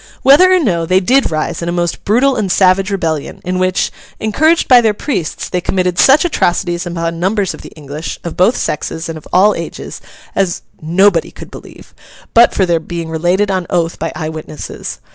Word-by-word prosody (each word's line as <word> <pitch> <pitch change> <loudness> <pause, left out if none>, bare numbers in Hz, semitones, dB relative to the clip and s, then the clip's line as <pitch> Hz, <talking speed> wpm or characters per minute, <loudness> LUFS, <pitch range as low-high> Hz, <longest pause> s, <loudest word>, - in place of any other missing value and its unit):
Whether 290 +8 +6
or 370 - +5
no, 170 - 0
they 185 +2 +3
did 260 +8 +2
rise 155 +1 -3
in 170 - -3
a - - -1
most 175 -1 -2
brutal 255 +6 +3
and 195 -6 -1
savage 190 +1 +3
rebellion; 165 -7 -3
in 180 +1 -2
which, 185 0 0 0.3
encouraged 310 +10 +2
by 250 -2 +7
their 220 -2 +1
priests, 195 - -3
they 180 - -2
committed 180 -1 -1
such 275 +5 +5
atrocities 175 - 0
upon 165 -1 -3
numbers 195 +2 0
of - - -11
the - - -11
English, 150 0 -7
of 170 - -6
both 190 +7 +3
sexes 160 +2 -3
and 165 - -5
of - - -17
all 200 +4 +4
ages, - - -7 0.3
as 190 -3 -1 0.2
nobody 175 +2 +2
could - - -12
believe, - - -13 0.4
but 235 +1 +6
for 190 - +1
their 170 -2 +1
being 170 0 -6
related 180 +5 +1
on 185 -2 -2
oath 170 -1 -1
by 165 - -3
eye 155 - -4
witnesses. 155 -1 -7
180 Hz, 195 wpm, -15 LUFS, 165-205 Hz, 0.4 s, by